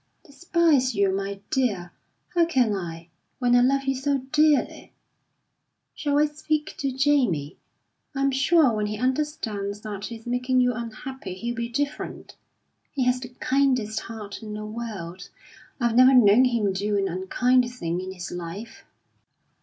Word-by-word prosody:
"Despise 295 -5 +2
you, 200 -1 +2
my 195 0 -4
dear! 210 - 0 0.4
How 345 -1 +4
can 255 -9 +2
I, 170 -3 -6 0.3
when 245 -1 +3
I 245 - +6
love 270 +2 +2
you 270 0 0
so 275 +2 0
dearly? 305 -1 +2 1.0
Shall 290 -2 -1
I 300 - +5
speak 300 0 -2
to 275 -1 -1
Jamie? 250 - +1 0.6
I'm 275 0 +1
sure 275 0 +4
when 210 -1 -1
he 210 0 -4
understands 225 -6 -2
that 205 -2 -6
he's 225 -1 -8
making 250 +1 +1
you 250 0 +3
unhappy, 235 -2 -7
he'll 235 +6 -3
be 235 -1 -4
different. 285 +4 -4 0.6
He 270 - -1
has 250 0 +2
the 250 -1 -8
kindest 255 -4 0
heart 215 -3 -8
in 215 -1 -6
the 215 0 -5
world; 205 -6 -7 0.5
I've 235 -2 +1
never 255 +2 +7
known 235 +1 +6
him 225 -6 +1
do 205 +2 -1
an 195 -1 +1
unkind 245 +7 +1
thing 175 -7 -3
in 185 0 -6
his 180 -2 -7
life." 175 +6 -7
240 Hz, 155 wpm, -25 LUFS, 200-270 Hz, 1.0 s, never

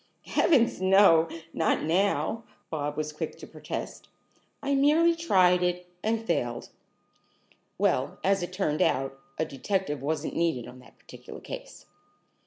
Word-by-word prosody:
"Heavens 235 - +2
no! 185 -4 +5 0.2
Not 160 - +1
now!" 195 +7 0 0.3
Bobs 150 -2 -3
was 150 0 -3
quick 150 - -5
to - - -10
protest. - - -7 0.6
"I 280 0 0
merely 305 +5 +4
tried 185 - +3
it, 180 0 -1 0.2
and 225 +1 -1
failed." 120 - -2 1.1
"Well, - - 0
as 195 0 +2
it 175 - -4
turned 185 -5 -1
out, 135 +1 0 0.2
a 160 - 0
detective 150 0 -2
wasn't 155 +2 -2
needed 165 -8 0
on 125 +1 -12
that 125 - -18
particular - - -12
case." - - -9
180 Hz, 135 wpm, -27 LUFS, 150-215 Hz, 1.1 s, no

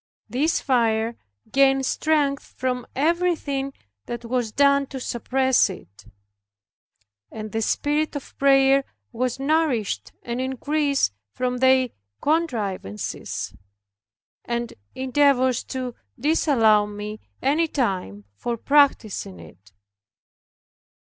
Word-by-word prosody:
This 275 +9 +1
fire 230 -3 +1 0.4
gained 270 0 +4
strength 290 -1 +1
from 250 -1 -2
everything 305 -3 0 0.4
that 240 0 -5
was 240 -2 -1
done 280 +2 +3
to 265 - -6
suppress 260 +1 +2
it. 100 - -11 1.3
And 215 -1 -7
the 225 - -1
spirit 295 +7 0
of 285 - -7
prayer 275 0 +5 0.3
was 250 +1 -2
nourished 275 -7 0
and 240 +1 -3
increased 280 - 0 0.2
from 250 - -2
their 260 -1 +4 0.3
contrivances 215 - -2 0.9
and 235 0 -3 0.2
endeavors 260 -1 +2
to 255 -2 -4 0.3
disallow 230 -8 +3
me 210 +1 -6 0.2
any 310 +5 +2
time 185 - -2
for 235 - -3
practicing 225 - +2
it. 90 +4 -15
260 Hz, 95 wpm, -24 LUFS, 225-280 Hz, 1.3 s, prayer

